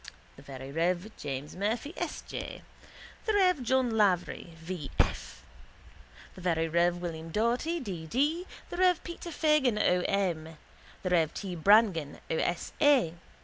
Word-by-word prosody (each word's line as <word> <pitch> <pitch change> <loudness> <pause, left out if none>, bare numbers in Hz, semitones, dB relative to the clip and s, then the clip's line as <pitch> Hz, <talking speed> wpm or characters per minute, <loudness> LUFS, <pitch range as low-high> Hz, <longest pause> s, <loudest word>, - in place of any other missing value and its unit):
the - - -14
very 135 0 -8
rev. 175 +6 0
James 140 0 -5
Murphy, 220 - -2
S. - - -4
J.; - - -6 0.6
the 435 - +3
rev. 365 -7 +4
John 255 0 +2
Lavery, 185 -4 +1
V. 165 -2 -6
F.; - - -1 0.9
the 185 - -12
very 165 -2 +1
rev. 170 +2 +2
William 165 -2 -5
Doherty, 240 - 0
D. 180 - -6
D.; 300 - 0 0.2
the 350 - -4
rev. 360 -2 +3
Peter 345 0 -7
Fagan, 300 -7 +2
O. 180 -4 +3
M.; 165 -5 -1 0.5
the 185 - -1
rev. 165 -3 +3
T. 190 -3 -4
Brangan, 180 -4 +4
O. 160 - +1
S. 175 +1 -1
A. 270 - +5
185 Hz, 145 wpm, -30 LUFS, 165-260 Hz, 0.9 s, A